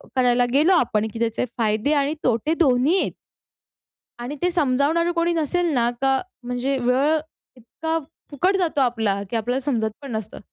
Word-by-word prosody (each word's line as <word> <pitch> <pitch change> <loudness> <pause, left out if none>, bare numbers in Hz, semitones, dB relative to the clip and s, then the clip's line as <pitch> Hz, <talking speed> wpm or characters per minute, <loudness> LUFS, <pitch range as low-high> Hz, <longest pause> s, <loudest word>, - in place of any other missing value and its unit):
करायला 245 -1 +3
गेलो 310 +7 +4
आपण 220 -3 0
की 225 - -6
त्याचे 230 +1 0
फायदे 220 +5 +1
आणि 285 0 +1
तोटे 250 +6 +1
दोन्ही 290 +3 +3
आहेत? - - -1 1.1
आणि 245 +5 -5
ते 360 - +2
समजावणारं 320 +2 +1
कोणी 340 0 +1
नसेल 340 +2 0
ना, 240 -3 +2
का 270 -1 +2 0.2
म्हणजे 250 +3 -2
वेळ 260 +5 +2 0.4
इतका 320 +7 -3 0.3
फुकट 360 +7 +1
जातो 335 -6 0
आपला 225 -6 +1
की 235 - -1
आपल्याला 245 +4 -1
समजत 230 -6 0
पण 275 - -8
नसतं. 220 -3 -5
265 Hz, 160 wpm, -22 LUFS, 240-315 Hz, 1.1 s, गेलो